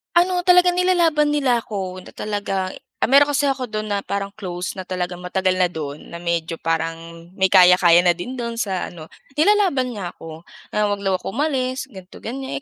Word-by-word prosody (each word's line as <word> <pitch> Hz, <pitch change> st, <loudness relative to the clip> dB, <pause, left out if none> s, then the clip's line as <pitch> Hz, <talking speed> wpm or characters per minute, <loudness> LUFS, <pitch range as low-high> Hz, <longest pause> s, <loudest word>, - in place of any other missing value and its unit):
Ano, 355 Hz, 0 st, +3 dB
talagang 360 Hz, 0 st, +5 dB
nilalaban 335 Hz, -5 st, +3 dB
nila 270 Hz, -5 st, +2 dB
ako, 195 Hz, -5 st, -5 dB
na -, -, -13 dB
talaga 200 Hz, -3 st, -3 dB, 0.3 s
ah, -, -, +2 dB
meron 285 Hz, +2 st, +5 dB
kasi 285 Hz, 0 st, +2 dB
ako 265 Hz, -2 st, -2 dB
do'n 215 Hz, -2 st, -5 dB
na 205 Hz, -1 st, 0 dB
parang 200 Hz, 0 st, -3 dB
close 180 Hz, -2 st, -5 dB
na 185 Hz, -, -6 dB
talagang 180 Hz, -1 st, -3 dB
matagal 185 Hz, +1 st, 0 dB
na 185 Hz, -, +4 dB
do'n 155 Hz, -4 st, -6 dB
na 170 Hz, -, -7 dB
medyo 170 Hz, -1 st, -1 dB
parang 165 Hz, +1 st, -3 dB
may 190 Hz, 0 st, +2 dB
kaya-kaya 180 Hz, -2 st, +7 dB
na 175 Hz, -, +5 dB
din 215 Hz, +10 st, -7 dB
do'n 235 Hz, -1 st, -3 dB
sa 195 Hz, -7 st, -3 dB
ano. 160 Hz, -2 st, -11 dB, 0.2 s
Nilalaban 320 Hz, -5 st, +2 dB
niya 195 Hz, -7 st, -6 dB
ako, 165 Hz, +1 st, -11 dB, 0.2 s
na 210 Hz, 0 st, 0 dB
'wag 205 Hz, -1 st, -1 dB
daw 195 Hz, -2 st, +1 dB
ako 185 Hz, -, -7 dB
umalis 260 Hz, -2 st, -1 dB
ganito, 190 Hz, -5 st, -13 dB
ganiyan. 265 Hz, +4 st, -5 dB
200 Hz, 190 wpm, -21 LUFS, 180-270 Hz, 0.3 s, kaya-kaya